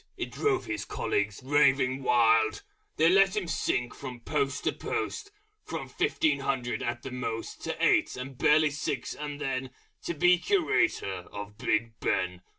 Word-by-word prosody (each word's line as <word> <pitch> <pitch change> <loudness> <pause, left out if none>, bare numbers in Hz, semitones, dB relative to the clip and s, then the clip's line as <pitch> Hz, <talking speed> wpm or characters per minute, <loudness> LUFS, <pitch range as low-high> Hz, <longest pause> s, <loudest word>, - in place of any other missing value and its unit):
It - - -4
drove 405 -4 0
his 340 -1 -3
Colleagues 415 - -2
raving 135 -1 +3
wild! 115 -3 +3 0.3
They 160 - +5
let 195 +2 +5
him 190 -4 -1
sink 125 -6 -1
from 125 -3 -8
Post 140 0 -1
to - - +2
Post, 415 -2 -4 0.3
From - - -5
fifteen 145 -3 +1
hundred 130 -3 -2
at 120 0 -3
the 135 - -6
most 125 -3 -5
To - - -3
eight, - - +3
and 130 +1 -6
barely 150 +3 +4
six 140 - -3
and 145 -1 -6
then 130 -2 -2 0.4
To 170 - -2
be 180 +3 +5
Curator 355 - +1
of 105 0 -7
Big 115 -1 0
Ben!... 90 -1 -1
135 Hz, 155 wpm, -28 LUFS, 120-165 Hz, 0.4 s, They